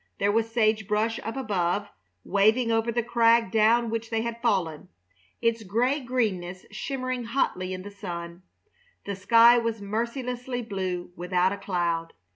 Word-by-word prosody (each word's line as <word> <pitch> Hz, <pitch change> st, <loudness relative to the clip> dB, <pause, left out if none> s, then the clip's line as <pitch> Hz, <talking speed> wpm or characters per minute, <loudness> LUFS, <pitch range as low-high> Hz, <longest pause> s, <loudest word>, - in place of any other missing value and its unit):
There 200 Hz, +1 st, +2 dB
was 225 Hz, +1 st, 0 dB
sage 220 Hz, -3 st, +2 dB
brush 215 Hz, +2 st, 0 dB
up 225 Hz, +5 st, -5 dB
above, 205 Hz, -4 st, -1 dB, 0.4 s
waving 220 Hz, +4 st, +3 dB
over 225 Hz, +1 st, +1 dB
the 240 Hz, +1 st, 0 dB
crag 230 Hz, -2 st, +3 dB
down 225 Hz, +1 st, +3 dB
which 230 Hz, 0 st, -3 dB
they 225 Hz, -1 st, -1 dB
had 235 Hz, 0 st, -5 dB
fallen, 185 Hz, -7 st, 0 dB, 0.6 s
its 230 Hz, 0 st, +2 dB
gray 240 Hz, +8 st, +1 dB
greenness 205 Hz, -9 st, -2 dB
shimmering 255 Hz, -2 st, -3 dB
hotly 205 Hz, -6 st, -1 dB
in 185 Hz, 0 st, -5 dB
the 205 Hz, -, -8 dB
sun; 175 Hz, -3 st, -7 dB, 0.6 s
the 200 Hz, -, -3 dB
sky 230 Hz, +5 st, +6 dB
was 230 Hz, -1 st, -2 dB
mercilessly 245 Hz, +4 st, -3 dB
blue 185 Hz, -5 st, -4 dB
without 180 Hz, +1 st, +1 dB
a -, -, -5 dB
cloud. 175 Hz, -4 st, -2 dB
220 Hz, 150 wpm, -26 LUFS, 190-235 Hz, 0.6 s, sky